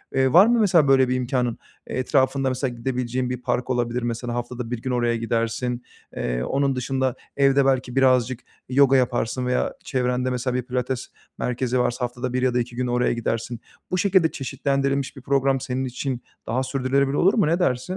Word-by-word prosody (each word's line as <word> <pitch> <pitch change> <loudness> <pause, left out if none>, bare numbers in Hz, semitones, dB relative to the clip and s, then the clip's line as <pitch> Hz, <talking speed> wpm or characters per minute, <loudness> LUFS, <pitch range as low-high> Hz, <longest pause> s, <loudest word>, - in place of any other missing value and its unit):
eee, 130 -1 +2
var 180 +4 +9
mı, 240 0 +3
mesela, 175 -9 +4
böyle 130 -2 +4
bir 130 - +1
imkânın, 125 -2 -1 0.3
eee, - - -3
etrafında 130 0 +1
mesela 130 -1 -2
gidebileceğin 125 +1 -2
bir 125 -1 -4
park 125 0 -1
olabilir. 120 -1 -1
Mesela 120 0 -3
haftada 120 0 -4
1 120 -2 -3
gün 130 - -3
oraya 120 -1 +1
gidersin, 115 +2 -2 0.3
eee, - - -2
onun 135 - 0
dışında 130 0 -1 0.2
evde 140 0 +4
belki 130 -2 0
birazcık 130 -2 +3 0.3
yoga 135 +1 +5
yaparsın 125 0 0
veya 125 0 0
çevrende, 125 -1 0
mesela, 125 0 -2
bir 125 - +1
pilates 125 0 -3 0.3
merkezi 125 0 -1
varsa 125 0 0
haftada 125 +1 -5
1 130 - 0
ya 130 -1 +2
da 125 - +2
2 120 0 -4
gün 125 0 -1
oraya 125 0 +1
gidersin. 115 0 -3 0.3
Bu 185 - +1
şekilde 185 -4 +3
çeşitlendirilmiş 140 0 -1
bir - - -9
program 135 0 +1
senin 130 0 -3
için 130 0 -4 0.3
daha 130 +3 0
sürdürebilir 135 +1 0
olur 190 +3 +4
mu, 210 -9 +2
ne 170 +3 +1
dersin? 125 -8 +1
125 Hz, 185 wpm, -23 LUFS, 125-135 Hz, 0.3 s, var